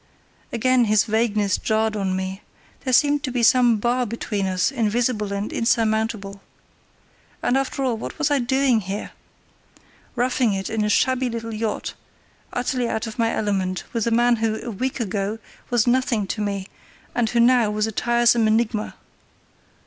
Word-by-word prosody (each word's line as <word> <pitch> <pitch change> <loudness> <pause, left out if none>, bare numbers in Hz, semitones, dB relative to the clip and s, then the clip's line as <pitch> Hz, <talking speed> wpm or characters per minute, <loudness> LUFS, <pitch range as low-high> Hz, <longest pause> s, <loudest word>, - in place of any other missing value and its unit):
Again 250 +1 +3
his 210 -2 +3
vagueness 215 -3 +1
jarred 220 0 0
on 190 -2 -1
me; 190 +1 -4 0.4
there 260 - -1
seemed 290 +3 +4
to 275 - -3
be 245 -1 -1
some 245 -2 +5
bar 240 +4 +1
between 210 -3 -3
us, 185 +5 +1
invisible 225 -3 0
and 200 +1 -3
insurmountable. 220 -3 0 1.0
And, 245 - +2
after 270 0 -1
all, 245 -4 0
what - - -7
was 305 -2 0
I 285 - +3
doing 265 -1 +2
here? 195 +2 -5 1.0
Roughing 245 -2 +1
it 195 0 -3
in 220 -1 0
a 210 - 0
shabby 260 +3 +2
little 230 -1 -5
yacht, 215 0 -3 0.6
utterly 245 -1 -1
out 220 +1 -2
of 225 +1 -8
my 230 0 +2
element, 190 -3 -1
with 230 -1 -1
a - - +3
man 240 +1 +3
who, 220 -1 -1
a 240 - -4
week 255 +6 -3
ago, 205 -1 -2 0.3
was 240 -3 +2
nothing 245 -4 +1
to 215 - -2
me, 200 -2 -2 0.5
and 235 -2 +1
who 235 - 0
now 240 -2 +4
was 210 0 0
a 220 - -3
tiresome 235 0 +3
enigma. 220 -1 0
225 Hz, 165 wpm, -22 LUFS, 210-245 Hz, 1.0 s, some